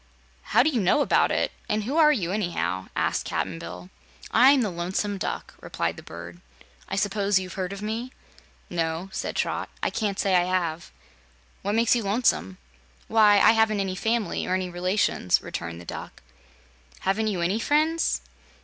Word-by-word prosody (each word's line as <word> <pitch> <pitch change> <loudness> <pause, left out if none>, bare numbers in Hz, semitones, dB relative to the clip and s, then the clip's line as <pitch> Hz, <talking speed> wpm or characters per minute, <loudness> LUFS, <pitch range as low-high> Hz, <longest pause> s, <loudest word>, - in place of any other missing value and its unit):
"How - - +3
do 310 - +2
you 245 -6 0
know 195 +11 +3
about - - +3
it, - - 0 0.2
and 210 0 0
who 260 +8 -3
are 310 -2 +6
you, 185 - -1
anyhow?" 95 - -2
asked - - 0
Cap'n 85 -3 -3
Bill. 90 +2 -9 0.4
"I'm 270 +1 +6
the 210 - -1
Lonesome 190 +4 -2
Duck," - - -4
replied - - -2
the - - -10
bird. 85 +1 -10 0.5
"I - - -2
suppose 200 0 +1
you've 185 -1 -3
heard 185 -1 -3
of 200 +1 -7
me?" 225 +4 -3 0.6
"No," 165 +1 -2
said - - -4
Trot, - - -1
"I - - +1
can't 205 -3 -2
say 195 -2 +1
I 175 -1 +4
have. 175 -3 -1 0.7
What 205 +2 -1
makes 230 +1 +4
you 240 - 0
lonesome?" 195 - +1 0.5
"Why, 215 -2 +6
I - - +7
haven't 220 -2 +2
any 190 -1 -1
family 225 +2 -1
or 185 - +1
any 185 -1 -2
relations," 180 - +1
returned 85 0 -5
the 85 - -11
Duck. - - -8 0.8
"Haven't 205 +3 0
you 195 -5 -1
any 185 +6 +1
friends?" 310 +6 +1
195 Hz, 175 wpm, -25 LUFS, 175-220 Hz, 0.8 s, I